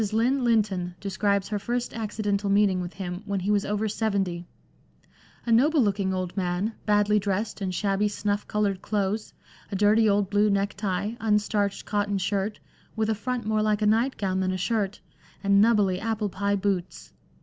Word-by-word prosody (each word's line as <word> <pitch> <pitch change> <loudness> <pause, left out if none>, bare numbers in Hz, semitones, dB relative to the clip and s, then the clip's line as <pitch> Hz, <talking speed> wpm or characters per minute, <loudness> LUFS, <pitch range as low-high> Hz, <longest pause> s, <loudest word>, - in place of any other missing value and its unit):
Lynn 250 +4 +2
Lynton 200 -7 +1
describes 200 0 0
her 210 -1 -1
first 240 +4 -2
accidental 205 -2 -2
meeting 195 -2 +3
with 175 0 -6
him 180 -1 -5
when 200 -1 -1
he 200 +3 0
was 205 -1 +2
over 210 +1 -1
seventy 195 -5 -1 0.3
— - - -35
" - - -29
a 235 - -1
noble 290 +7 +4
looking 200 -5 +1
old 185 -1 -3
man, 185 +3 -1
badly 210 0 +3
dressed 200 +2 -2
in 190 - -1
shabby 195 +2 0
snufif 205 0 -2
coloured 205 -3 0
clothes, 210 +1 -2 0.4
a - - -2
dirty 210 +2 +4
old 200 -1 +2
blue 205 +1 +3
necktie, 200 0 -1
un 215 -2 +3
starched 205 -1 -1
cotton 205 -1 0
shirt 200 +2 -1 0.2
— - - -32
with 220 0 0
a - - +3
front 245 +2 -3
more 215 0 +1
like 215 0 +1
a - - +3
night 230 +5 +2
gown 190 -2 -1
than 185 0 0
a 185 - -2
shirt 205 0 -1 0.2
— - - -28
and 200 0 +4
'knubbly' 205 -5 +3
applepie 205 -2 -1
boots. 190 -3 -3
205 Hz, 185 wpm, -26 LUFS, 195-215 Hz, 0.4 s, noble